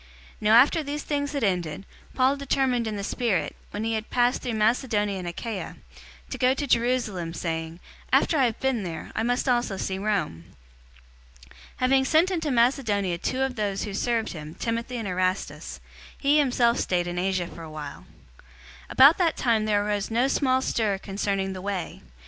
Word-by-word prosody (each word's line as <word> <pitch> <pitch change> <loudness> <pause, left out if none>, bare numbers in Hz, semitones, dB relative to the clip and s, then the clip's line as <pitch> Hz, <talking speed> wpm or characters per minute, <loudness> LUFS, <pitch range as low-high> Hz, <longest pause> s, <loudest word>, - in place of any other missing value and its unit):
019:021 - - -28
Now 215 +1 +5
after 280 +7 +6
these 295 0 -4
things 285 -1 -2
had 280 -4 -2
ended, 180 -3 -1 0.3
Paul 260 +2 +3
determined 265 -4 0
in 215 - -3
the 200 - -4
spirit, 210 -5 -1
when 210 - -4
he 225 0 -1
had 220 0 -3
passed 245 +1 +2
through 240 -3 -3
Macedonia 215 -3 +1
and 180 - -6
Achaia, 190 +2 -5 0.6
to - - -3
go 255 +1 +3
to 285 - -2
Jerusalem, 230 -9 0
saying, 165 0 -4 0.3
"After - - +3
I 270 -4 +4
have 230 -3 -2
been 265 -4 0
there, 165 -4 -6
I - - 0
must 245 +4 0
also 240 -5 +1
see 190 0 -3
Rome." 190 - -2 1.0
019:022 60 - -19 0.3
Having 265 +1 +3
sent 325 +6 +3
into 325 -4 -1
Macedonia 235 -7 +1
two 260 +8 -1
of 265 -1 -2
those 205 -2 -2
who 210 - -5
served 230 +2 0
him, 155 -1 -8
Timothy 235 +1 -3
and 225 -3 -4
Erastus, 185 +1 -2 0.4
he 290 +2 +3
himself 245 -3 +2
stayed 175 -1 0
in 175 0 -3
Asia 185 -1 0
for 170 - -10
a 160 - -8
while. 150 -2 -8 0.3
019:023 - - -21 0.4
About 280 +5 +7
that 335 -3 +2
time 225 -4 +2
there 205 -1 +1
arose 205 -1 -1
no 235 +3 +2
small 260 -2 +1
stir 215 -6 0
concerning 195 0 -2
the 185 - -7
Way. 195 -3 -4
220 Hz, 185 wpm, -26 LUFS, 190-255 Hz, 1.0 s, About